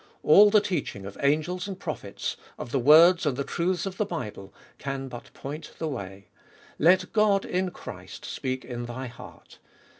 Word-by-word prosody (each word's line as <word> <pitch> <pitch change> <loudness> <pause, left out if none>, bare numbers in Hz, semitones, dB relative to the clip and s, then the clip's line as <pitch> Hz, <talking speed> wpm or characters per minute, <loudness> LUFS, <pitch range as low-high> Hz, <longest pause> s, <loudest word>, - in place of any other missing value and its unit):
All 205 +7 +8
the 210 0 +5
teaching 170 - -3
of 100 - -8
angels 155 +7 +1
and 190 -2 -6
prophets, 130 - -4 0.2
of 120 - -7
the 135 - +1
words 165 +7 +7
and 135 -3 0
the 140 - -1
truths 175 +4 -1
of 195 -1 -5
the 210 - +1
Bible, 110 - -6 0.3
can 135 -1 -4
but 120 -1 -10
point 145 +4 -7
the 160 - -3
way: 100 -8 -7 0.5
let 180 +3 +4
God 210 -3 +3
in 185 +1 -1
Christ - - -10
speak 130 0 -4
in 120 -1 -5
thy 130 +2 -5
heart. 120 -1 -12
150 Hz, 175 wpm, -27 LUFS, 125-185 Hz, 0.5 s, All